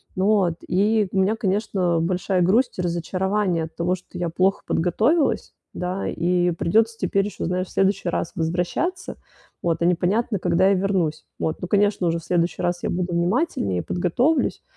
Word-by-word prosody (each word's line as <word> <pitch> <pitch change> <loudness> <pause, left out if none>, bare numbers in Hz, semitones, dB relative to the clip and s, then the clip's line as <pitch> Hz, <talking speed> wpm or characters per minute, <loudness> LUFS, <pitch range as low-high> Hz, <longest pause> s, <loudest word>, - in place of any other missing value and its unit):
Ну, 200 +1 +3
от. 170 -2 0
И 205 +2 +2
у 195 - 0
меня, 200 +4 +2
конечно, 190 -4 0
большая 180 +1 0
грусть 205 +4 +2
и - - +2
разочарование 180 +1 -1
от 160 - -14
того, 175 +2 0
что 180 0 -12
я 175 -1 -1
плохо 185 +4 +1
подготовилась, 230 - +1 0.2
да, 180 +2 -3
и 175 0 +1
придется 220 +7 +1
теперь 195 0 0
еще, 210 - -5
знаешь, 180 +1 -1
в - - -16
следующий 195 -2 +1
раз 170 - -2
возвращаться, 180 - -2 0.4
вот, 170 -1 -1
а - - +2
непонятно, 190 +5 +1
когда 185 +2 +3
я - - +4
вернусь. 185 -5 -1
Вот. 160 - -2
Ну, 180 - -3
конечно, 200 -2 +2
уже 165 0 +1
в - - -15
следующий 175 0 0
раз 175 0 -1
я - - -1
буду 175 0 -2
внимательнее, 170 - 0
подготовлюсь, 235 - 0
185 Hz, 175 wpm, -23 LUFS, 175-200 Hz, 0.4 s, я